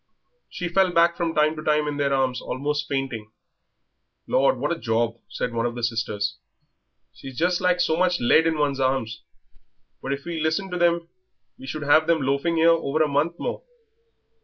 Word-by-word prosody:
She 180 - -4
fell 185 +1 +2
back 170 0 +3
from 170 -1 -2
time 155 +1 +3
to 155 - -6
time 150 -1 +1
in 145 -1 -3
their 140 -1 0
arms, 130 -2 0
almost 145 +3 -3
fainting. 135 -6 -3 1.0
"Lord, 135 0 +2
what 145 +5 -2
a 170 - -2
job!" 115 -1 -1
said 120 - -3
one 120 +1 -2
sister; 115 -2 -2 0.9
"she's 135 -2 -11
just 175 +2 +1
like 180 -1 +2
so 160 -2 +2
much 180 0 +2
lead 160 +7 +4
in 160 -1 0
one's 145 -2 0
arms. 130 -4 -1 0.8
But 135 - -2
if 140 +2 -7
we 170 -1 -4
listened 160 +5 -1
to 180 - -3
them 170 -1 +2 0.5
we 130 - -10
should 150 +3 -5
have 155 +3 +4
them 165 -4 +2
loafing 140 +5 0
here 165 +1 +5
over 155 -2 +1
a - - +1
month 150 +4 0
more." - - -4
150 Hz, 185 wpm, -24 LUFS, 135-170 Hz, 1.0 s, here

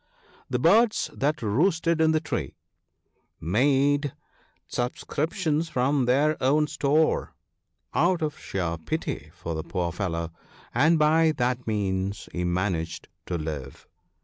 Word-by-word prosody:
The - - 0
birds 205 - +3
that 145 -1 -1
roosted 160 - +2
in 160 - +5
the 155 - +3
tree - - -4 0.8
made 140 - +2 0.5
subscriptions 155 +6 -1
from 130 0 +1
their 145 +5 +2
own 145 +4 +3
store, 150 +1 +1 0.6
out 175 0 +2
of 150 -1 -3
sheer 85 -3 -3
pity 80 -1 -4
for 85 - -5
the 80 - -2
poor 85 +1 -2
fellow, 85 -2 -3 0.4
and 155 +7 +4
by 155 +1 +4
that 125 0 -1
means 100 -1 -1
he 90 - -3
managed 90 -2 -2 0.2
to 90 - -1
live. 75 -4 -6
130 Hz, 120 wpm, -26 LUFS, 95-155 Hz, 0.8 s, in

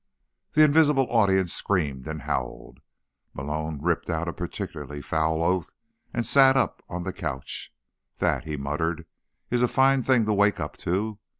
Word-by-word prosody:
The 155 - +6
invisible 150 -2 +4
audience 95 -6 +3
screamed 70 -10 -1
and 80 -3 -5
howled. - - -4 0.6
Malone 75 +3 -3
ripped 85 +4 -1
out 80 0 -1
a 85 - -2
particularly 85 -4 -6
foul 80 +2 0
oath 90 -1 0 0.4
and 120 -1 -2
sat 135 +2 +5
up 130 - 0
on 90 -1 -4
the - - -4
couch. 65 0 -5 0.5
"That," - - 0
he 75 -1 -4
muttered, 80 +4 -2 0.5
"is 120 0 +2
a 125 - +4
fine 135 +1 +3
thing 125 -3 +3
to 105 - +1
wake 100 0 +3
up 75 -3 -4
to." 100 +4 -2
90 Hz, 160 wpm, -26 LUFS, 80-120 Hz, 0.6 s, The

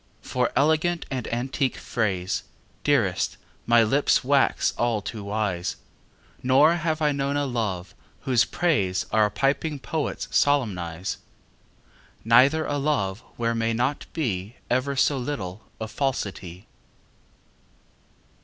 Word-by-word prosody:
For 125 -1 0
elegant 160 +4 +2
and 130 -3 -3
antique 130 +2 -1
phrase, 95 -6 -1 0.4
Dearest, - - +1 0.3
my 120 -1 +6
lips 135 +6 +2
wax 140 +1 +2
all 120 -2 +1
too 105 +1 -6
wise; 100 -4 -2 0.7
Nor 145 +6 +5
have 160 -1 -1
I 150 - +4
known 140 0 -1
a 145 - 0
love 105 -8 -3 0.3
whose 125 -4 +3
praise 100 - 0
Our 110 -1 +4
piping 145 +6 0
poets 150 +2 -3
solemnize, 95 - 0 1.1
Neither 135 +7 +5
a 145 0 -1
love 120 -10 0 0.2
where 115 0 0
may 115 0 0
not 125 +5 -1
be 110 - -3 0.2
Ever 130 +3 +1
so 135 +1 +2
little 110 -7 -5 0.2
falsity. 100 -8 -3
125 Hz, 115 wpm, -25 LUFS, 105-145 Hz, 1.1 s, my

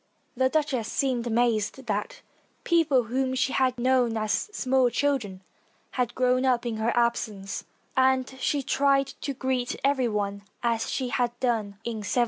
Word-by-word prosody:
The 260 +1 +2
duchess 265 -7 0
seemed 250 -3 0
amazed 235 +1 0
that 235 - -3 0.4
people 320 -7 +3
whom 260 +3 -1
she 260 +1 0
had 255 -1 +2
known 245 -2 +2
as 215 - -1
small 260 -8 +2
chil 280 +3 +1
dren 190 -5 -9 0.5
had 245 -2 -1
grown 255 0 +2
up 250 -2 +2
in 230 -2 -2
her 220 +2 +1
absence, 220 -5 -1 0.3
and 260 0 +3
she 280 +2 0
tried 275 0 +3 0.2
to 280 -3 -3
greet 255 -1 -1
every 275 -3 +2
one 200 -2 -2 0.2
as 230 -1 0
she 255 -2 -2
had 240 -1 -1
done 220 -6 -1
in 235 -1 -3
1789. 210 - -6
250 Hz, 160 wpm, -26 LUFS, 230-265 Hz, 0.5 s, people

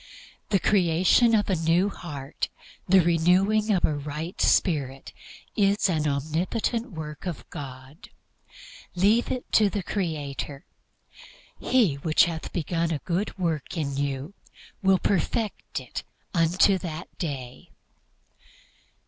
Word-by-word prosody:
The 205 - +4
creation 185 +5 +4
of 210 - +2
a 190 - +1
new 170 +4 +2
heart, 145 -7 -5 0.4
the 190 0 +7
renewing 180 +6 +3
of 190 -4 +3
a 155 - +1
right 150 +4 -5
spirit, 135 -7 +1 0.4
is 200 0 +3
an 155 -3 +1
omnipotent 175 - -1
work 155 +1 -7
of 175 - -5
God. 135 +2 -9 0.9
Leave 205 +6 +3
it 255 - -4
to 210 -2 +5
the 200 -1 -3
Creator. 150 -5 -4 0.9
"He 215 - +2
which 155 +2 +4
hath 165 -2 -5
begun 170 0 -1
a 160 - 0
good 190 +4 -2
work 165 -3 -2
in 140 -3 -2
you 140 +4 -3 0.5
will 190 -1 +4
perfect 200 +4 -1
it - - -6 0.3
unto 180 +3 +3
that 170 -3 -7
day." 130 -6 -5
170 Hz, 120 wpm, -26 LUFS, 150-195 Hz, 0.9 s, the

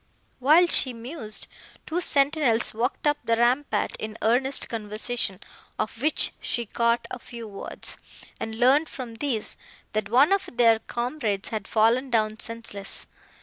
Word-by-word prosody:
While 305 +7 +6
she 265 -6 +3
mused, 230 -1 -2 0.4
two 340 +3 -2
sentinels 280 -6 +2
walked 240 +7 -2
up 295 0 +2
the 230 - +2
rampart 245 +5 +1
in 215 0 -6
earnest 255 +5 +2
conversation, 215 -2 -2 0.4
of 225 +2 -4
which 305 +2 +3
she 235 - -2
caught 235 +2 0
a 250 - -5
few 235 -1 -9
words, 200 -1 -5 0.4
and 220 0 -4
learned 265 +7 +4
from 250 -3 -7
these, 245 -5 -1 0.4
that 215 -1 -1
one 265 - +5
of 395 - 0
their 230 -2 +5
comrades 235 -4 -2
had 215 -3 -4
fallen 230 +5 +2
down 215 -2 +1
senseless. 230 -4 -4
235 Hz, 145 wpm, -25 LUFS, 220-270 Hz, 0.4 s, While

